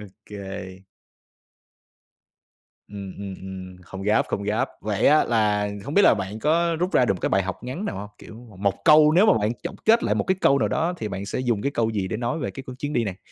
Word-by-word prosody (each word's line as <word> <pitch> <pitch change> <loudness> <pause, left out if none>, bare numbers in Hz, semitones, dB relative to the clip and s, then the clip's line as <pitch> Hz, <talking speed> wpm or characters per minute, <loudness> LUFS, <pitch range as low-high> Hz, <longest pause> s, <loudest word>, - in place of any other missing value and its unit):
OK. 105 0 -11 2.5
Ừm, 100 -2 -7
ừm, 100 -1 -6
ừm, 95 -1 -9
không 95 +2 -9
gấp, 105 +2 +2
không 100 - -2
gấp. 110 +6 0
Vậy 105 -2 0
á, 155 +2 +5
là 105 -3 +1 0.2
hông 140 - -5
biết 205 - +6
là - - +6
bạn 100 +1 -5
có 165 +5 +1
rút 180 +3 -1
ra - - +4
được 100 - +1
một 90 - -9
cái - - 0
bài 95 - +2
học 95 +4 -5
ngắn 130 +12 -5
nào - - -3
hông? 100 +2 -6
Kiểu, 110 - -12 0.2
một 100 0 -1
câu 150 0 +7
nếu 190 +6 +5
mà - - +6
bạn 105 +1 0
chọn - - -5
kết 230 +2 +5
lại - - +1
một - - 0
cái 190 - +2
câu 140 - +4
nào - - +1
đó 165 +3 0
thì 110 - -4
bạn 100 0 -5
sẽ - - -3
dùng 120 -5 0
cái 140 - 0
câu 115 -3 0
gì 100 -3 -2
để 110 - -3
nói 120 +6 -2
về 135 - -3
cái 135 - -8 0.2
chuyến 145 +2 -4
đi 120 - +1
này? 95 -3 -5
110 Hz, 245 wpm, -24 LUFS, 100-145 Hz, 2.5 s, câu